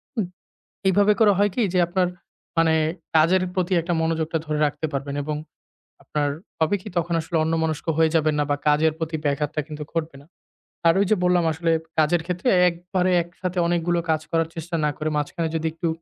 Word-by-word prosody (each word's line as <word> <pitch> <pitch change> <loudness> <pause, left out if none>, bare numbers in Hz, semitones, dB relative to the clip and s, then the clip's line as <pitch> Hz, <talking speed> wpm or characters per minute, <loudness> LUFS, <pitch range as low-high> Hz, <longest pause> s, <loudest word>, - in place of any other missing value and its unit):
হুম। 220 -5 0 0.6
এইভাবে 205 +2 +4
করে 215 -2 +6
হয় 205 0 +3
কি 245 - +1
যে 180 - +3
আপনার 180 +1 +1 0.5
মানে 165 -1 +4 0.4
কাজের 170 +4 +4
প্রতি 185 0 0
একটা 170 +2 -2
মনোযোগটা 160 0 0
ধরে 150 -1 -2
রাখতে 145 +1 -2
পারবেন 140 0 -3
এবং 150 +1 -3 0.7
আপনার 145 -1 -1 0.3
হবে 160 +4 +2
কি - - -8
তখন 170 0 -1
আসলে 165 +2 -3
অন্যমনস্ক 160 0 -1
হয়ে 160 -1 +4
যাবেন 155 -1 +3
না 145 - +2
বা 145 - +2
কাজের 155 +2 +3
প্রতি 160 -1 -2
ব্যাঘাতটা 145 +1 0
কিন্তু 150 -1 -7
ঘটবে 165 -3 -3
না। - - -21 0.6
আর 165 - +6
ওই 200 - +3
যে - - +6
বললাম 180 -1 +3
আসলে 165 +2 0 0.3
কাজের 160 +2 +3
ক্ষেত্রে 180 +7 -1 0.2
একবারে 180 +2 -1
একসাথে 180 +2 -6
অনেকগুলো 175 0 +1
কাজ 155 -1 +2
করার 165 -1 +1
চেষ্টা 165 +1 -4
না - - +2
করে 155 - -2
মাঝখানে 160 +3 -2
যদি 160 0 0
একটু 165 +1 -3
165 Hz, 185 wpm, -23 LUFS, 155-175 Hz, 0.7 s, করে